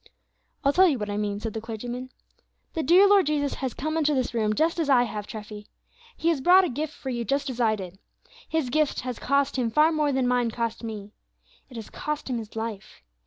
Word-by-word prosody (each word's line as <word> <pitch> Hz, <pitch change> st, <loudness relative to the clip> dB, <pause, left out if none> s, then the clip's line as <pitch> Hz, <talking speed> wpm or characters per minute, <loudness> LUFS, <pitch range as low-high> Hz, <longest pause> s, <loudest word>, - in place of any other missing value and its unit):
"I -, -, +1 dB
will -, -, +2 dB
tell 375 Hz, +3 st, +6 dB
you 295 Hz, -6 st, +1 dB
what 210 Hz, -2 st, -4 dB
I 205 Hz, -, -2 dB
mean," 205 Hz, -1 st, -2 dB
said 220 Hz, 0 st, -4 dB
the 220 Hz, -, -4 dB
clergyman. 240 Hz, +3 st, -6 dB, 0.6 s
"The 325 Hz, -, -1 dB
dear 355 Hz, +7 st, +6 dB
Lord 395 Hz, -5 st, +5 dB
Jesus 290 Hz, -2 st, 0 dB
has 260 Hz, -3 st, -2 dB
come 310 Hz, +3 st, -3 dB
into 300 Hz, -2 st, +2 dB
this 255 Hz, -2 st, -1 dB
room 215 Hz, -2 st, +1 dB
just 325 Hz, +5 st, +1 dB
as 315 Hz, -3 st, 0 dB
I 250 Hz, -3 st, +6 dB
have, 210 Hz, -3 st, -5 dB
Treffy. 210 Hz, -1 st, -8 dB, 0.5 s
He 330 Hz, -, +1 dB
has 315 Hz, -5 st, +1 dB
brought 365 Hz, +5 st, +6 dB
a 360 Hz, -, 0 dB
gift 295 Hz, +4 st, -3 dB
for 265 Hz, -, -5 dB
you, 240 Hz, -1 st, -2 dB
just 275 Hz, +4 st, -1 dB
as 250 Hz, -1 st, -4 dB
I 220 Hz, -2 st, +3 dB
did. 190 Hz, -2 st, -9 dB, 0.5 s
His 315 Hz, -6 st, -1 dB
gift 305 Hz, +1 st, +1 dB
has 250 Hz, -2 st, -5 dB
cost 280 Hz, +1 st, +1 dB
Him 245 Hz, -3 st, +1 dB
far 305 Hz, +7 st, +4 dB
more 305 Hz, -2 st, +1 dB
than 260 Hz, -2 st, +1 dB
mine 245 Hz, -1 st, +2 dB
cost 230 Hz, 0 st, -3 dB
me; 210 Hz, -2 st, -6 dB, 0.6 s
it 250 Hz, -, -13 dB
has 225 Hz, -2 st, -8 dB
cost 300 Hz, -3 st, -4 dB
Him 240 Hz, -, -1 dB
His 220 Hz, -1 st, -10 dB
life. 220 Hz, -, -6 dB
250 Hz, 235 wpm, -26 LUFS, 220-300 Hz, 0.6 s, tell